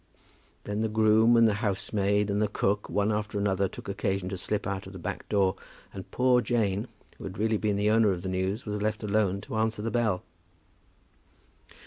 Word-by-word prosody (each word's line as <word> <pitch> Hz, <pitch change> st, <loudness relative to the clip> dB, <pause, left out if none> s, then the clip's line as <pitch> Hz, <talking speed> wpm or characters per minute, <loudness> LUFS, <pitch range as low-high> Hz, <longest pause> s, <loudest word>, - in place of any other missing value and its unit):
Then 105 Hz, +1 st, -3 dB
the 110 Hz, -, 0 dB
groom 110 Hz, +2 st, +4 dB
and 115 Hz, -1 st, +6 dB
the 110 Hz, -, +2 dB
housemaid 100 Hz, -1 st, 0 dB
and 100 Hz, +1 st, 0 dB
the 105 Hz, -, +3 dB
cook, 100 Hz, 0 st, -1 dB
one 105 Hz, +1 st, +1 dB
after 105 Hz, 0 st, -2 dB
another, 100 Hz, -1 st, +1 dB
took -, -, -10 dB
occasion 95 Hz, -2 st, -2 dB
to 95 Hz, -, -3 dB
slip 105 Hz, +3 st, -2 dB
out 95 Hz, -1 st, -3 dB
of 95 Hz, -, -10 dB
the -, -, -7 dB
back 85 Hz, -, -6 dB
door, 100 Hz, -2 st, +2 dB, 0.4 s
and 95 Hz, -2 st, -8 dB
poor 125 Hz, -1 st, +3 dB
Jane, 110 Hz, -2 st, 0 dB, 0.3 s
who -, -, -9 dB
had 95 Hz, +1 st, -6 dB
really 110 Hz, +1 st, +1 dB
been 105 Hz, -1 st, 0 dB
the 105 Hz, +1 st, +2 dB
owner 110 Hz, -2 st, +4 dB
of 90 Hz, -2 st, -4 dB
the -, -, -3 dB
news, 95 Hz, +4 st, -2 dB
was 105 Hz, -1 st, -3 dB
left 110 Hz, +1 st, -1 dB
alone 100 Hz, -2 st, +1 dB
to 110 Hz, -, -5 dB
answer 110 Hz, -1 st, 0 dB
the 115 Hz, -, -2 dB
bell. 110 Hz, -6 st, 0 dB
105 Hz, 200 wpm, -28 LUFS, 100-110 Hz, 0.4 s, and